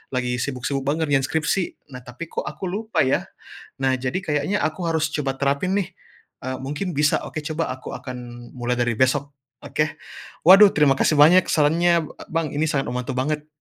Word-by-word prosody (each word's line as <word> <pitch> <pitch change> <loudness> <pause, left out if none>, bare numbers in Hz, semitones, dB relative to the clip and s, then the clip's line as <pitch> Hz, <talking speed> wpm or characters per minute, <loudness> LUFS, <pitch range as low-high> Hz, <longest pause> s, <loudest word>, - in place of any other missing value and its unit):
lagi 125 -1 -1
sibuk-sibuk 135 +2 -2
banget 155 0 0
ngerjain 135 -2 +2
skripsi. 160 +1 -2
Nah, 125 - -7
tapi, 145 +7 -8
kok, - - -4
aku 175 +5 -5
lupa, 220 +3 0
ya. 130 - 0 0.5
Nah, 135 -1 +2
jadi 130 +6 -2
kayaknya 155 +3 -1
aku 155 +3 -2
harus 160 -2 +1
coba 140 -3 -3
terapin, 140 +6 0
nih, 195 - -2 0.6
eee, 130 0 -3
mungkin 145 +8 -4
bisa. 150 -1 +1
Oke, - - -5
coba 155 -1 -3
aku 130 0 -7
akan 120 -2 -9
mulai 120 0 -1
dari 120 -1 +1
besok, 135 +3 +2 0.3
oke. 145 +2 0 0.6
Waduh, 195 +2 +9
terima 150 -2 +4
kasih - - +2
banyak 175 +5 +7
sarannya 165 +3 +3 0.2
e - - -12
Bang, 160 -2 -1
ini 150 - +1
sangat 140 -3 -1
membantu 125 +2 -3
banget. 150 +4 -2
145 Hz, 180 wpm, -22 LUFS, 130-160 Hz, 0.6 s, Waduh